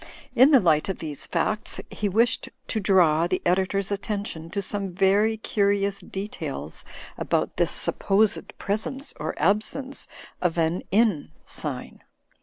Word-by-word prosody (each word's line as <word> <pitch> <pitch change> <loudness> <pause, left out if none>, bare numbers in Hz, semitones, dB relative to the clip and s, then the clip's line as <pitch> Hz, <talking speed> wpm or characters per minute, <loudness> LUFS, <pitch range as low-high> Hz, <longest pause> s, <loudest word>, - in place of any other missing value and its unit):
In 260 +2 +7
the 280 -4 +7
light 160 -4 +2
of 190 - -2
these 150 -3 -5
facts, 215 0 -1
he 210 - -2
wished 230 +5 +2 0.2
to 220 - 0
draw 175 -5 +4
the 185 +1 0
editor's 190 +2 +1
attention 200 -5 -3
to 200 - -3
some 195 -1 -2
very 200 +4 +3
curious 200 -2 0
details 195 +2 -5 0.4
about - - -1
this - - +2
supposed 205 +1 +2
presence 220 +8 -2
or 155 +2 -3
absence 215 - 0 0.3
of 175 -2 0
an 165 +2 +1
inn 205 -7 +2 0.2
sign. - - -5
200 Hz, 135 wpm, -25 LUFS, 180-215 Hz, 0.4 s, In